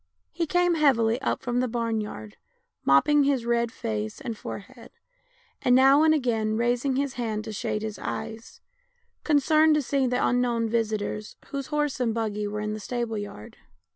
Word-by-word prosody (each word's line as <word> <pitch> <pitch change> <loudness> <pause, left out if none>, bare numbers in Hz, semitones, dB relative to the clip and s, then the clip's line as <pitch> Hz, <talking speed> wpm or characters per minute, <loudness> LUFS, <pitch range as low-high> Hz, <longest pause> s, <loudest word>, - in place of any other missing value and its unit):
He 335 -2 -2
came 355 +1 +2
heavily 255 -6 +3
up - - -1
from 245 0 0
the 255 - +1
barn 230 -2 -1
yard, 110 - -8 0.5
mopping 285 - +4
his 270 -4 +1
red 235 -1 +1
face 110 - -4
and 230 - -5
forehead, 235 +4 -9 0.7
and 250 - +4
now 270 +3 +6
and 315 0 +5
again 225 -7 +1
raising 245 +3 +1
his 275 -1 -1
hand 215 -2 -2
to 220 -1 -6
shade 215 +1 -3
his 220 -1 -5
eyes, 225 +1 -6 0.6
concerned 310 +1 +4
to 300 - +2
see 270 0 +1
the 250 0 +1
unknown 240 -2 +1
visitors, 215 -2 -2
whose 275 -2 -4
horse 295 -3 -1
and 230 -3 0
buggy 210 -2 -2
were 210 +1 -4
in 210 0 -2
the 215 - -5
stable 235 +1 -3
yard. 105 - -9
235 Hz, 170 wpm, -26 LUFS, 215-275 Hz, 0.7 s, now